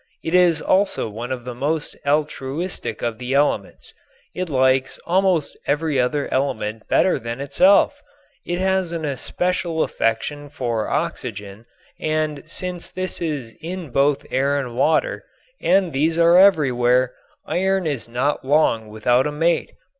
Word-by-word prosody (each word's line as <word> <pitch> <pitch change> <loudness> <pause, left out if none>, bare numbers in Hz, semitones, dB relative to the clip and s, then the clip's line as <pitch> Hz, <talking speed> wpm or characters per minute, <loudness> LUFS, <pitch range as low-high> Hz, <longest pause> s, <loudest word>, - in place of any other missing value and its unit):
It 165 - -3
is 175 -3 +4
also 190 - +1
one 115 +4 -6
of 125 -2 -4
the 125 - -5
most 145 +5 -2
altruistic 150 +3 -2
of 115 -1 -2
the 125 +2 -2
elements. 145 +1 0 0.4
It 185 -1 -3
likes 130 -1 +2
almost 180 -3 +1
every 145 -1 +1
other 140 +3 0
element 110 -5 -2
better 185 - +3
than 115 +2 -5
itself. 190 - +3 0.4
It 175 - -3
has 190 -1 0
an 165 -2 -3
especial 165 +4 -1
affection 145 +6 -2
for 120 -5 -2
oxygen, 115 -9 -4 0.3
and, 155 -2 -1
since 180 0 -4
this 185 -1 -4
is 145 -9 -3
in 170 -2 -6
both 140 +3 +2
air 140 +2 +1
and 125 -4 -4
water, 155 +5 +1 0.4
and 185 -1 +2
these 160 +4 +1
are 170 0 +5
everywhere, 130 -9 +4 0.3
iron 190 0 0
is 140 -7 -3
not 130 +5 -1
long 130 -6 +2
without 120 +5 +1
a - - -3
mate. 165 +3 0
145 Hz, 140 wpm, -21 LUFS, 125-170 Hz, 0.4 s, are